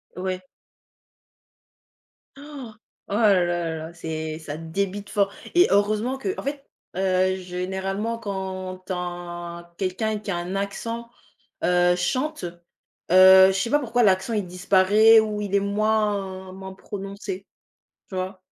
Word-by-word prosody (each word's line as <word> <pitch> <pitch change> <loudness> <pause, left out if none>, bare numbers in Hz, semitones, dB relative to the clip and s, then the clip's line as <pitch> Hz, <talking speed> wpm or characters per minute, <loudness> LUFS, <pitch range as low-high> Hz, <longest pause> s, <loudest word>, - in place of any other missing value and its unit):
Ouais. 185 0 -3 2.0
Oh! 280 -6 -9 0.3
Oh - - -5
là 175 -6 +2
là, 160 +1 -7
c'est 160 -1 -5
ça 155 -1 -6
débite 195 +5 -3
fort 200 -2 +2 0.2
et 350 +1 +6
heureusement 215 +6 +2
qu'en 380 +9 -3
fait, 280 0 -4 0.3
heu, 185 0 +2
généralement 190 +5 -3
quand 190 -3 -5
tin 175 -1 -5
quelqu'un 210 +3 -1
qui 205 -1 -5
a 175 - -1
un 175 +2 -4
accent, 230 +4 -4 0.6
heu, 175 0 +4
chante, 265 - -1 0.7
heu, 190 +1 +9
je - - +3
sais 195 +5 -1
pas 295 +4 +3
pourquoi 245 -2 0
l'accent 190 +2 +2
il 205 -4 -1
disparaît 195 +5 +5
ou 215 -1 -1
il 200 -1 -4
est 200 - +5
moins 200 -2 -1
moins 190 0 -8
prononcé, 195 0 -7 0.6
tu 190 - -7
vois? 185 0 -4
190 Hz, 130 wpm, -24 LUFS, 180-215 Hz, 2.0 s, heu